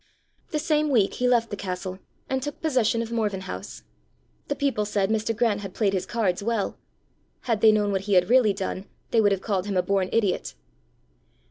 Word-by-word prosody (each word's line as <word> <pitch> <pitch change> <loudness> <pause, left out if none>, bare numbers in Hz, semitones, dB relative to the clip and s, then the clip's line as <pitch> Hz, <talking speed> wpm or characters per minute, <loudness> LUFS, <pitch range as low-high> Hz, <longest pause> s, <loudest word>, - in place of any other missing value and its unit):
The 310 - -1
same 305 -1 +1
week 220 -8 +3
he 250 - 0
left 235 -2 +2
the - - -2
castle, 185 -1 -5 0.3
and 265 0 -1
took 290 +2 -5
possession 250 -7 +1
of 230 - -8
Morven 210 -5 -1
House. 185 - -7 0.6
The 285 - -1
people 275 -7 0
said 205 -1 0
Mr. 220 0 0
Grant 225 -4 +1
had 195 -2 -8
played 200 -3 +1
his 190 -1 -1
cards 205 -6 0
well: 225 -1 -1 0.7
had 225 -4 -1
they 220 - +7
known 210 -1 +1
what 190 -1 0
he - - +3
had 180 -1 +5
really 240 -2 +5
done, 190 0 -4 0.3
they 225 - +4
would 205 -1 +4
have 195 -1 0
called 195 -3 -1
him 200 -2 -1
a 180 - +3
born 195 -2 0
idiot. 210 -5 0
210 Hz, 205 wpm, -25 LUFS, 195-235 Hz, 0.7 s, they